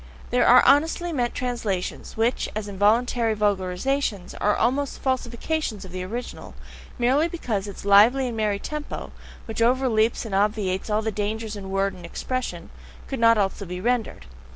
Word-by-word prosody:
There - - +3
are - - +7
honestly 325 +4 +3
meant 245 -4 -1
translations, 230 -9 -3
which, 230 +3 +1
as 215 -1 -3
involuntary 220 +3 +2
vulgarizations, 205 +2 -1
are 210 0 +3
almost 270 +4 0
falsifications 255 -3 -2
of 185 - -11
the 185 0 -5
original, 230 +7 -6 0.4
merely 265 +6 +3
because 230 - -3
its 200 0 -9
lively 225 +7 +6
and 240 - -4
merry 210 -2 0
TEMPO 300 +8 -6 0.3
(which 225 0 -5
overleaps 235 -2 +2
and 220 - -6
obviates 200 -1 0
all 215 +1 +1
dangers 215 0 -3
in 195 -2 -7
word 195 +1 0
and 180 - -12
expression) 255 +9 -4 0.3
could 270 - -5
not 230 0 +5
also 200 0 0
be 180 -1 -6
rendered. 240 - -1
220 Hz, 155 wpm, -24 LUFS, 200-250 Hz, 0.4 s, are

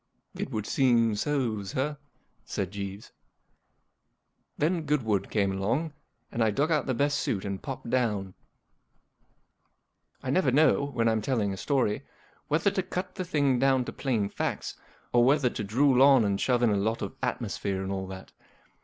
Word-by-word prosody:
*' - - -53
It - - -4
would 105 -1 -3
seem 115 -4 +3
so, 120 -3 -1
sir," 130 +9 -2 0.5
said 95 -2 -3
Jeeves. 100 0 -6 1.5
Then 165 +3 +1
Goodwood 110 -9 0
came 100 -3 +1
along, 115 +12 -1 0.4
and 115 - 0
I 110 - +3
dug 145 +10 0
out 155 - +1
the 130 - 0
best 145 +2 +1
suit 100 -3 -2
and 100 -1 -4
popped 135 -3 -6
down. 105 -7 0 1.9
I 130 - -2
never 155 -3 +3
know, 145 +1 +4
when 120 -5 0
I'm 110 -1 +2
telling 105 -4 0
a - - -4
story, 125 -4 0 0.5
whether 160 +6 +2
to 190 - 0
cut 180 0 -5
the 190 - -4
thing 145 -7 +1
down 130 -1 +3
to - - -6
plain 115 -7 0
facts - - -3 0.4
or 120 0 +5
whether 135 -1 +3
to 105 - -4
drool 130 +5 +3
on 135 -4 +7
and 100 -1 0
shove 125 -2 +2
in 115 - +4
a 100 - +2
lot 110 +3 -1
of 100 - -4
atmosphere 95 -1 -2
and 95 - -4
all 95 -1 -3
that. 95 0 -9
120 Hz, 170 wpm, -28 LUFS, 100-140 Hz, 1.9 s, on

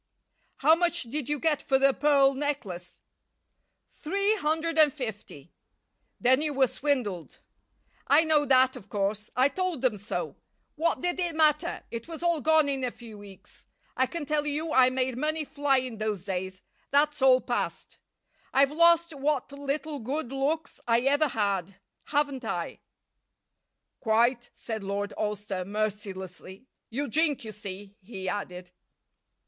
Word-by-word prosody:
"How 305 +4 +5
much 345 +1 +1
did 255 +3 -3
you 295 - +1
get 315 -2 +1
for 265 - +2
the 275 0 +4
pearl 275 -1 +4
necklace?" 250 -12 -4 0.9
"Three 400 +6 0
hundred 320 -1 0
and 305 -2 +7
fifty." 220 - -7 0.7
"Then 260 +3 +4
you 300 -2 -1
were 270 -1 +5
swindled." 245 - -2 0.7
"I 295 +3 +6
know 310 -2 +3
that, 260 0 +4
of 195 - -12
course. 205 +1 -2
I 255 +2 +5
told 355 -2 -3
them 240 -5 +2
so. 205 +2 -4 0.4
What 335 +2 0
did 355 +1 -1
it 345 -3 -1
matter? 305 -1 +2
It 230 -1 -6
was 330 0 -7
all 340 -3 +1
gone 315 0 +4
in 270 -2 -2
a 250 - 0
few 235 -2 -12
weeks. 200 -2 -15 0.3
I 260 - +2
can 335 0 -5
tell 300 0 0
you 305 +2 -2
I 255 -1 +6
made 255 -1 -1
money 310 +2 -1
fly 285 -1 +1
in 250 -4 -3
those 210 -4 -2
days. 185 -1 -4 0.3
That's 295 +1 +2
all 260 -1 +6
past. - - -4 0.5
I've 275 +1 +4
lost 335 +1 +4
what 280 -1 -1
little 285 +1 -3
good 260 +3 -3
looks 285 +4 -2
I 235 0 +4
ever 285 +4 +3
had, 195 -6 -2 0.3
haven't 285 -3 -1
I?" 175 -6 -4 1.2
"Quite," 240 +2 +2
said 220 -3 -5
Lord 200 +1 -3
Alcester, 205 -3 -3
mercilessly. 195 -1 -5 0.2
"You 280 +5 -3
drink, 295 -1 +1
you 220 - -6
see," 205 0 -8
he 190 -2 -7
added. 180 -2 -5
265 Hz, 150 wpm, -28 LUFS, 210-300 Hz, 1.2 s, and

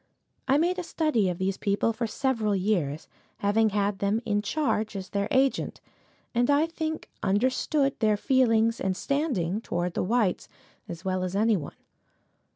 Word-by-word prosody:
I 270 +1 +4
made 355 +4 +1
a - - -3
study 305 - +1
of 175 - -3
these 190 +1 -1
people 205 +3 0
for 225 +1 -2
several 220 -3 0
years, 180 -7 -1 0.3
having 215 +2 +2
had 200 -1 0
them 200 +2 +1
in 205 -2 +1
charge 220 -5 -1
as 190 -1 -5
their 200 0 -1
agent, 265 0 +1 0.5
and 245 +2 +2
I 290 +2 +4
think 320 -1 -4
understood 255 +7 +1
their 215 -2 +3
feelings 230 -2 +2
and 190 -1 -1
standing 225 - -1
towards 175 -4 -2
the - - -1
whites 215 -2 0 0.4
as 170 +2 -8
well 185 -1 0
as 185 +1 -3
any 220 +2 +3
one. 155 -7 -5
215 Hz, 160 wpm, -27 LUFS, 195-260 Hz, 0.5 s, I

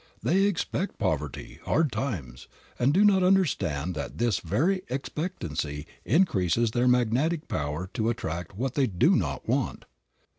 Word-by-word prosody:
They 195 +3 +3
expect 200 0 -1
poverty, 75 -3 -3
hard 155 -3 +1
times, 95 - -4 0.3
and 125 +3 +3
do 195 +7 +4
not 195 -2 +5
understand 140 - +1
that 75 - -5
this 115 -4 +1
very 160 - +1
expectancy 90 - -4 0.2
increases 115 - +2
their 120 +2 +1
magnetic 125 +7 +2
power 75 +4 -2
to 115 -2 0
attract 85 -5 -4
what 130 +2 -1
they 135 -2 +2
do 90 -4 +3
not - - -2
want. - - -1
120 Hz, 140 wpm, -27 LUFS, -, 0.3 s, not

